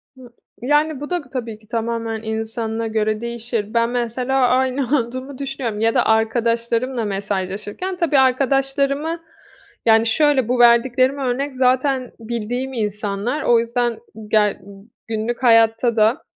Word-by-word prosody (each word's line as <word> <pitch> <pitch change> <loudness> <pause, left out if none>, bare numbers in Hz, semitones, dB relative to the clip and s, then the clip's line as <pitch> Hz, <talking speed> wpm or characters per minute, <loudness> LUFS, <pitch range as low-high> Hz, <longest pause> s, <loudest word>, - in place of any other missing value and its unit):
Hı 255 -2 -14 0.3
Yani, 295 +3 +1
bu 290 - -6
da 355 -1 -1
tabii 230 -4 -5
ki 215 - -24
tamamen 230 -1 -3
insanına 225 0 -3
göre 215 0 -1
değişir. 235 -2 -4
Ben, 230 0 +2
mesela 250 +2 0
aynı 260 +2 +1 0.2
olduğumu 255 +3 -6
düşünüyorum 265 -6 -4
ya 225 +1 +2
da - - +2
arkadaşlarımla 230 +2 0
mesajlaşırken 205 - -3
tabii 325 -6 +2
arkadaşlarımı 275 +4 +1 0.7
Yani, 225 0 +5
şöyle; 280 0 +3
bu 250 0 +1
verdiklerimi 255 +3 +4
örnek 265 +2 -2
zaten 255 0 +1
bildiğim 240 +3 -4
insanlar. 210 +4 -2
O 235 -1 +4
yüzden 235 0 -1 0.3
ge 210 -2 +2 0.5
günlük 225 +3 -3
hayatta 225 0 +4
da, 225 +9 +3
235 Hz, 130 wpm, -20 LUFS, 225-265 Hz, 0.7 s, Yani